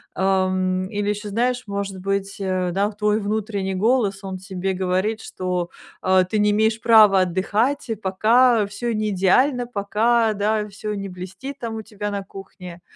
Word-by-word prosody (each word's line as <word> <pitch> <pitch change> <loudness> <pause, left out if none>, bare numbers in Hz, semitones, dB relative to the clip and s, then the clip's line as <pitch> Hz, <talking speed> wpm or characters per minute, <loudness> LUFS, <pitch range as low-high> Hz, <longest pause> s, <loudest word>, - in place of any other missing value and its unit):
Эм, 185 -1 +1
или 205 0 -2
ещё 210 0 -3
знаешь, 245 +4 0
может 200 -1 -4
быть, 195 +1 -2
э, 185 -2 -1
да, 200 +3 +1
твой 210 0 0
внутренний 205 -2 -2
голос, 205 -1 +1
он 190 -1 -5
тебе 190 0 -4
говорит, 190 +4 -1
что, 180 -1 -3 0.3
э, 185 0 +4
ты 215 - 0
не 210 0 +3
имеешь 220 +1 +2
права 210 -4 +6
отдыхать, 210 +9 0
и 225 - 0
пока 220 +4 +3
всё 235 +2 -3
не 215 0 -1
идеально, 245 +7 +2
пока, 225 +1 +1
да, 210 +1 0
всё 210 +1 -5
не 200 -1 -5
блестит, 190 +10 -8
там, 230 -2 -4
у 220 - -4
тебя 205 -1 -5
на 200 -1 -3
кухне. 180 -3 -11
200 Hz, 165 wpm, -22 LUFS, 190-220 Hz, 0.3 s, права